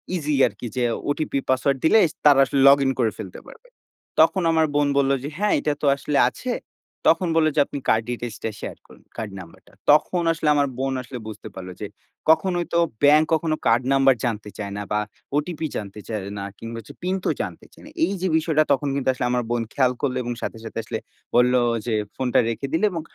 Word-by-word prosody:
Easy 150 -3 -1
আরকি 105 +3 -7
যে 125 - +1 0.3
OTP, 145 -1 -1
password 135 +1 +2
দিলে 220 +7 +6 0.3
তারা 145 -2 +7
আসলে 135 +1 -1
লগ 140 +1 +8
ইন 135 - +3
করে 115 -3 +2
ফেলতে 95 -5 -8
পারবে। - - -15 0.5
তখন 190 - +5
আমার 160 -1 +3
বোন 145 -1 +3
বললো 140 0 +3
যে, 145 - -4
"হ্যাঁ, 210 +1 +1
এটা 150 - 0
তো - - -1
আসলে 140 +1 -2
আছে।" 250 - -5 0.6
তখন 185 - +4
বললো 155 -1 +4
যে, 150 - +2
"আপনি 140 - -6
card 110 - +3
details 120 -2 -4
টা 115 - 0
শেয়ার - - -6
করুন, - - -18
কার্ড 110 -3 -4
নাম্বারটা।" 85 -3 -14 0.2
তখন 170 +4 +3
আসলে 160 -2 -3
আমার 145 -1 +3
বোন 135 0 -1
আসলে 125 0 -8
বুঝতে 110 0 -8
পারলো 90 -1 -7
যে 105 - -3 0.4
কখনোই 175 +1 +3
তো 170 - +4 0.2
ব্যাংক 150 +2 +6
কখনো 160 0 +1
কার্ড 115 +3 +3
নাম্বার 135 -1 +5
জানতে 105 -3 -3
চায় 100 -2 -5
না, 105 - -3
বা 105 - +2 0.4
ওটিপি 160 +1 -2
জানতে 100 0 -7
চায় 110 -2 -2 0.2
না, 100 - -4 0.2
কিংবা 115 0 -6 0.2
পিন 185 +2 -1
তো - - +2
জানতে - - -6
চায় - - -17
না। - - -12
এইযে 190 - -2
বিষয়টা 155 -1 +2
তখন 140 +1 -1
কিন্তু 135 -1 0
আসলে 125 - -2
আমার 125 0 +1
বোন 120 -1 +1
খেয়াল 130 -2 +3
করলো 130 -3 0
এবং 120 - -3
সাথে, - - -4
সাথে 115 - -7
আসলে 110 0 -4 0.4
বললো 125 +1 +5 0.3
যে 115 - 0 0.2
ফোনটা 125 -2 +1
রেখে 125 +4 -3
দিলে 190 +6 +3
এবং 170 -2 -3
135 Hz, 210 wpm, -23 LUFS, 115-155 Hz, 0.6 s, লগ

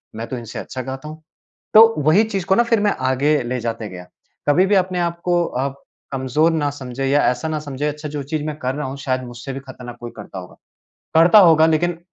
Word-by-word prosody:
मैं 115 +1 -5
तो 130 - -5
इनसे 115 -2 -7
अच्छा 130 - -6
गाता 135 +3 -7
हूँ। 155 +1 -10 0.5
तो 225 +1 +8
वही 160 +9 +5
चीज़ 195 -5 -3
को 190 - +3
ना 235 - +4
फिर 235 -2 +2
मैं 205 0 +2 0.2
आगे 145 +3 +2
ले 125 +1 -3
जाते 115 -2 -4
गया। 90 -1 -9 0.4
कभी 180 +6 +4
भी 200 +1 +2
अपने 185 -1 +1
आप 170 0 -2
को 175 -1 +2 0.2
आप 140 0 -5 0.3
कमज़ोर 135 +5 +1
ना 150 -3 0
समझें 135 -1 -5
या 140 +2 +3
ऐसा 125 +5 -4
ना 155 -1 -2
समझें, 145 0 -4
अच्छा 150 +1 -6
जो 145 -1 -4
चीज़ 150 +2 -3
मैं 155 -1 -3
कर 130 -1 -2
रहा 150 -2 -3
हूँ 135 +1 -6
शायद 130 -1 -2
मुझसे 120 +2 -8
भी 135 - -5
ख़तरनाक 125 -3 -10
कोई 120 0 -7
करता 95 - -8
होगा। 90 - -12 0.6
करता 170 +6 +7
होगा, 160 -4 +6
लेकिन 165 +2 +1
145 Hz, 235 wpm, -20 LUFS, 130-170 Hz, 0.6 s, तो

